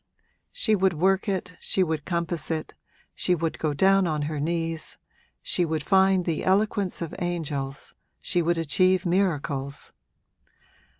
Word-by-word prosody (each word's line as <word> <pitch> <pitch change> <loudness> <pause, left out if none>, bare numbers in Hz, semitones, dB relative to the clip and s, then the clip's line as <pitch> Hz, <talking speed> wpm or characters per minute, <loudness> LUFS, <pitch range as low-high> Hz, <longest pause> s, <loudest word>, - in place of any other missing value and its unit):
She 220 - +1
would 190 -2 +2
work 190 +5 +2
it, 180 -2 -3
she 190 - +1
would 160 -4 -2
compass 170 -2 -1
it, 160 -1 -3 0.4
she 180 - +1
would 165 -1 -2
go 155 - 0
down 195 +3 +4
on 155 -2 -1
her 150 0 -3
knees, 165 +1 -2 0.5
she 180 - +1
would 160 -2 -1
find 190 0 +4
the 165 -3 -1
eloquence 195 -2 +1
of 165 - -6
angels, 150 -6 -3 0.3
she 175 - 0
would 170 +1 +1
achieve 185 +4 +2
miracles. 150 -7 -1
170 Hz, 140 wpm, -26 LUFS, 155-185 Hz, 0.5 s, down